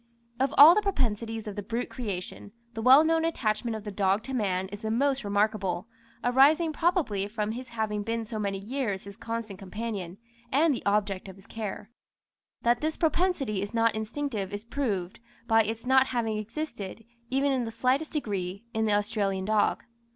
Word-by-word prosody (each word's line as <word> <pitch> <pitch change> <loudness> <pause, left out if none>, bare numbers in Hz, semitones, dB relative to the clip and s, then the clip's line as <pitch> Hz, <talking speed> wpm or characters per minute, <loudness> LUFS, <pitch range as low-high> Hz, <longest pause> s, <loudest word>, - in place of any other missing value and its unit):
Of 270 +1 +2
all 300 +4 +11
the 425 - +2
propensities 225 - -1
of 205 - -5
the 205 - -3
brute 230 +4 -3
creation, 205 -3 -6 0.2
the 225 - -4
well 260 +6 +8
known 325 0 +2
attachment 230 -7 -1
of 215 - -6
the 210 - -5
dog 195 +1 +1
to 265 - -6
man 190 -6 0
is 205 +1 -8
the 220 - -3
most 270 +3 +1
remarkable, 205 -3 0 0.4
arising 290 +6 +4
probably 300 - +1
from 210 0 -2
his 250 +2 -7
having 220 -2 -2
been 225 +2 -2
for - - -16
so 220 - -3
many 200 -2 -1
years 210 -1 -3
his 200 0 -10
constant 225 -4 -5
companion, 195 -2 -5 0.3
and 295 +3 +4
the 245 - -5
object 200 -2 0
of 190 - -10
his 195 0 -15
care. 215 -1 -6 0.7
That 240 0 +3
this 310 +1 -1
propensity 320 - +1
is 205 +3 -5
not 230 0 +3
instinctive 220 -2 -3
is 205 +2 -6
proved, 215 -9 -2 0.3
by 225 -1 +5
its 225 +2 -4
not 265 +1 +5
having 225 -3 -1
existed, 225 -3 -6 0.2
even 275 +2 +2
in 255 -3 0
the 225 - -5
slightest 255 +7 0
degree, 200 - -3
in 220 0 +1
the 210 - +2
Australian 205 -2 0
dog. 215 0 +2
225 Hz, 185 wpm, -28 LUFS, 205-260 Hz, 0.7 s, all